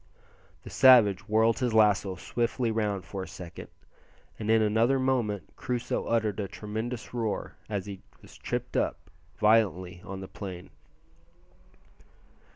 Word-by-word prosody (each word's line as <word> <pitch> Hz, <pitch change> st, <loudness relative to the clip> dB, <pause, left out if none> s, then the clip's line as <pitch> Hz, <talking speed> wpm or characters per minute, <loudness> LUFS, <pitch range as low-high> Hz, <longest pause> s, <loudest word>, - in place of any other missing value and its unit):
The -, -, -10 dB
savage 110 Hz, -7 st, +6 dB
whirled 110 Hz, +2 st, +3 dB
his 125 Hz, -4 st, 0 dB
lasso 105 Hz, -3 st, +3 dB
swiftly 115 Hz, +5 st, -1 dB
round 105 Hz, -4 st, -1 dB
for 100 Hz, -, -6 dB
a 95 Hz, -, -6 dB
second, 90 Hz, -2 st, -9 dB, 0.7 s
and 110 Hz, -1 st, -4 dB
in 110 Hz, 0 st, +5 dB
another 110 Hz, +5 st, +3 dB
moment 120 Hz, -8 st, -1 dB
Crusoe 125 Hz, -1 st, -2 dB
uttered 110 Hz, -3 st, 0 dB
a 100 Hz, -, -2 dB
tremendous 110 Hz, +5 st, -5 dB
roar 115 Hz, -3 st, -2 dB, 0.2 s
as 100 Hz, -3 st, -2 dB
he 100 Hz, -2 st, -8 dB, 0.2 s
was -, -, -16 dB
tripped -, -, -4 dB
up -, -, -2 dB, 0.3 s
violently 95 Hz, -5 st, +2 dB
on 95 Hz, 0 st, -7 dB
the 95 Hz, -, -7 dB
plain. 90 Hz, -3 st, -8 dB
105 Hz, 135 wpm, -28 LUFS, 100-115 Hz, 0.7 s, savage